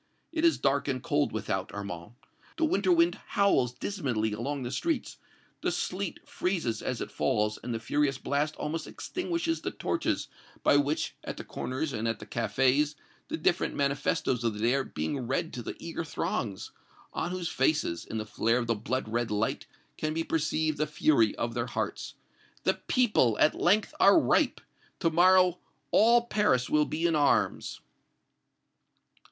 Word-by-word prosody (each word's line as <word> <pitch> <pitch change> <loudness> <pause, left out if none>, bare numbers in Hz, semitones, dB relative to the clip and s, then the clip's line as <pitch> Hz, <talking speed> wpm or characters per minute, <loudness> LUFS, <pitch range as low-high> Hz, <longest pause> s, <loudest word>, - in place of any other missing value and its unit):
It 325 -1 -2
is 335 -1 +5
dark 140 0 +1
and 130 -2 -2
cold 145 -3 +1
without, 95 -3 -2
Armand; 100 -1 -6 0.4
the 325 - +2
winter 195 -10 +2
wind 170 0 +3 0.2
howls 165 -12 +4
dismally 125 - -2
along 135 +5 -3
the 120 - -4
streets, 330 - -2 0.4
the - - 0
sleet 185 -1 -3
freezes 165 - -1
as 125 -3 -3
it - - -5
falls 105 -4 0
and 125 - -5
the 115 - -2
furious 135 +4 0
blast 145 +3 -1
almost 160 +1 -4
extinguishes 340 -2 -2
the - - -2
torches - - -1 0.4
by - - +5
which, 145 +2 0
at - - -6
the - - -6
corners 135 +3 -3
and 110 0 -2
at 115 - -1
the - - -10
cafés, 135 +5 +1 0.3
the - - -3
different - - +1
manifestoes 140 -3 0
of 115 -2 0
the - - -7
day 115 +3 +2
are 135 0 +1
being 120 - -3
read - - -1
to 125 - -4
the - - -6
eager 165 0 -5
throngs, 105 -9 -3 0.4
on - - -2
whose 180 -2 -3
faces, 135 - +1
in 110 - -5
the 110 - -3
flare 115 +3 +1
of 125 - -1
the 115 - +1
blood 115 +3 -2
red 115 +1 -1
light, 105 +1 -1 0.3
can 155 0 -2
be 165 - 0
perceived 155 -1 0
the 155 - +1
fury 150 -7 +3
of 115 0 -2
their 120 +1 -2
hearts. - - -4 0.5
The - - +3
people, 210 - +2
at 155 - +4
length, 205 +4 +2
are 200 +10 +7
ripe! - - +2 0.4
To 165 -3 +2
morrow 180 +1 +5 0.3
all 235 +2 +5
Paris 210 - +1
will 150 0 +4
be 160 +3 -2
in 165 -2 +3
arms!" 145 -1 +1
140 Hz, 170 wpm, -29 LUFS, 115-170 Hz, 0.5 s, are